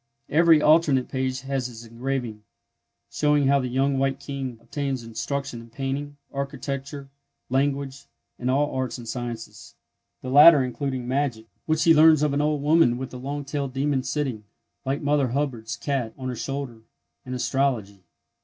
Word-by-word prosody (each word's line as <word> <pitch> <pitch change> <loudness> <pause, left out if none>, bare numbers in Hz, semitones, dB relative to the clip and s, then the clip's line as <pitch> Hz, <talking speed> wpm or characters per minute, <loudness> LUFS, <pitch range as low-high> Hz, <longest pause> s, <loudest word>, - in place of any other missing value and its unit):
Every 160 0 +5
alternate 150 -4 +4
page 130 0 -2
has 135 -2 -2
its 115 -1 -11
engraving, 120 -1 -4 0.7
showing 150 -1 +2
how 140 +1 +4
the 130 - -2
Young 135 +2 +1
White 135 0 0
King 135 -4 -5
obtains 135 +1 -3
instruction 120 +2 -4
in 115 - -14
painting, 140 +3 -4 0.2
architecture, 140 0 -5 0.4
language, 140 0 -1 0.3
and 125 - -2
all 145 +3 +1
arts 130 -1 -2
and 120 -2 -10
sciences, 120 -1 -6 0.5
the 130 - -4
latter 145 0 +8
including 130 -1 -3
magic—which 140 +4 -2
he 165 - +6
learns 155 -1 +6
of 150 -2 +1
an 145 - +1
old 150 -1 0
woman 150 -5 +4
with 130 0 -6
a - - -6
long 140 +3 -5
tailed 140 -2 -3
demon 135 0 0
sitting, 130 -6 -3 0.4
like 140 +3 -2
Mother 145 -2 +2
Hubbard's 125 -3 -2
cat, 130 -6 -2
on 130 -1 -4
her 125 - -3
shoulder—and 130 -1 -7
astrology. 125 -7 -1
135 Hz, 155 wpm, -25 LUFS, 125-145 Hz, 0.7 s, latter